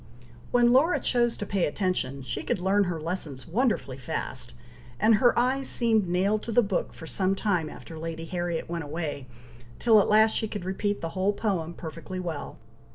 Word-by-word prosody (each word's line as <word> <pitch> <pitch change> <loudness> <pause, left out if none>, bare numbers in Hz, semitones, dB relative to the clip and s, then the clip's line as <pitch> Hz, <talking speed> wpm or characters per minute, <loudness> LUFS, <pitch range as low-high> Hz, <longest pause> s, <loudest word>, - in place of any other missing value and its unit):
When 240 0 +4
Laura 310 +8 +4
chose 240 -2 +1
to 205 - -4
pay 195 -3 +1
attention, 145 -6 -1
she - - -3
could - - -1
learn 195 +2 +3
her 175 -3 -2
lessons 155 -5 -4
wonderfully 185 - 0
fast, 125 - -4 0.4
and 220 +1 +5
her 245 -2 +5
eyes 260 +3 +1
seemed 220 -5 +2
nailed 195 +4 +1
to 230 - -5
the 240 +2 +4
book 195 -3 -1
for 160 - -11
some 190 +3 0
time 180 -7 0
after 160 +1 -10
Lady 165 0 -5
Harriet 175 -1 -3
went 170 -1 -3
away, 145 -3 -4 0.5
till 225 -3 +5
at - - -1
last 215 +1 +5
she 220 - 0
could 205 -4 -6
repeat 205 +2 -1
the 165 - -3
whole 190 +3 0
poem 180 -6 -2
perfectly 170 +2 -7
well. 165 -5 -5
185 Hz, 185 wpm, -27 LUFS, 165-215 Hz, 0.5 s, and